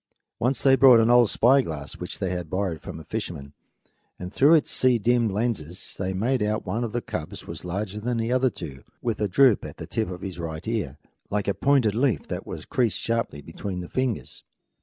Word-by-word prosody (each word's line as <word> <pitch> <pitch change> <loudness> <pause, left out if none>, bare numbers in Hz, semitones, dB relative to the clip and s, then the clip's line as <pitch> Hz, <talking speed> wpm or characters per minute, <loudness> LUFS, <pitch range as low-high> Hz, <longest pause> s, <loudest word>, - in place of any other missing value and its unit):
Once 125 +3 0
they 135 -1 +6
brought 130 -3 +7
an 115 +1 +4
old 120 -3 +6
spyglass 115 - +2
which - - -6
they 95 - -2
had 90 -3 -4
borrowed 95 -4 -2
from 80 - -8
a - - -10
fisherman, 80 -11 -5 0.6
and 90 +1 -7
through 150 +5 +6
its 155 - +2
sea 130 -2 +3
dimmed 115 +1 +2
lenses 95 -6 -2
they 95 -1 -1
made 115 +7 0
out 105 +1 0
that - - -20
one 115 +2 -1
of 115 - -3
the 120 +1 -3
cubs - - -6
was - - -7
larger 100 +3 -4
than 120 +2 -2
the 115 +1 -1
other 130 +1 +3
two, 70 - -9 0.2
with 115 -3 -2
a 105 - +2
droop 125 +3 +4
at - - -8
the - - -7
tip 110 -4 -2
of 90 -1 -7
his 95 -3 -6
right 80 0 -5
ear, 100 - -2 0.3
like 105 0 -1
a 100 - +2
pointed 135 -6 +2
leaf 120 - 0
that - - -5
has - - -6
been - - -15
creased 120 -5 +1
sharply 115 -11 -2
between 90 +2 -5
the 90 - -7
fingers. 130 -4 -3
110 Hz, 225 wpm, -25 LUFS, 90-120 Hz, 0.6 s, brought